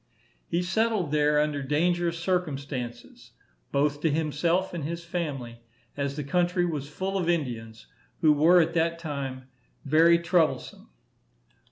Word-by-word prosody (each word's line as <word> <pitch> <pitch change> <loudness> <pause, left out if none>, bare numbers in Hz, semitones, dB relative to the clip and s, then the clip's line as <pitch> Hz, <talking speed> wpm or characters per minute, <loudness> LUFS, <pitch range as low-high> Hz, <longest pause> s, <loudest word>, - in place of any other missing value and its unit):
He 175 +1 0
settled 210 -3 0
there 150 0 +3
under 150 -1 0
dangerous 170 +4 0
circumstances, 140 -9 -4 0.4
both 145 +1 +1
to 160 - +2
himself 165 +5 0
and 170 -4 -4
his 170 +3 -5
family, 135 -9 -4 0.3
as 140 -1 -2
the 150 - -3
country 175 +4 +1
was 150 -5 -3
full 190 +5 -3
of 175 -2 -1
Indians, 115 -9 -3 0.4
who 155 -2 +6
were 165 +5 +5
at 165 0 +2
that 165 0 +1
time 140 -5 -5 0.4
very 165 +4 +5
troublesome. 170 -1 0
155 Hz, 135 wpm, -27 LUFS, 140-175 Hz, 0.4 s, who